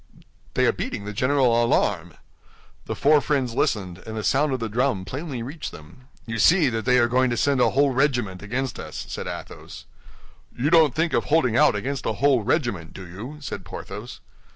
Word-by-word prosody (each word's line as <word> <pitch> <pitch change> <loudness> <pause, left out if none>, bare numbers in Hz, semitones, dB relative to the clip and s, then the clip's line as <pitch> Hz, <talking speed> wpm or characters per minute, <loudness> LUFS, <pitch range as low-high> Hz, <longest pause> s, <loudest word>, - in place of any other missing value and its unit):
"They - - +3
are - - +4
beating 100 - -5
the 105 - -5
general 130 0 +2
alarm." 90 -7 0 0.7
The - - -4
four 150 +1 +4
friends 135 -6 0
listened, 95 -7 -1
and 110 +3 -8
the 110 - -3
sound 145 +5 +2
of 130 - -1
the 115 - -2
drum 110 -3 0
plainly 130 - -5
reached 145 +6 -6
them. 80 +12 -14 0.2
"You 115 -1 -4
see, 160 - +5
they 120 +2 +1
are 120 -1 +4
going 130 +2 +2
to 120 - -1
send 140 +1 +2
a 120 - +4
whole 140 +3 +2
regiment 120 -8 0
against 125 +5 -3
us," - - -7
said - - -5
Athos. - - -8 0.7
"You 140 +6 0
don't 160 -6 +5
think 160 +1 0
of - - +1
holding 135 -7 +2
out 115 - +5
against 135 +5 -3
a 110 - 0
whole 135 +2 +3
regiment, 110 - -1
do 95 - -9
you?" 110 - -8
said - - -6
Porthos. - - -8
125 Hz, 195 wpm, -24 LUFS, 110-140 Hz, 0.7 s, see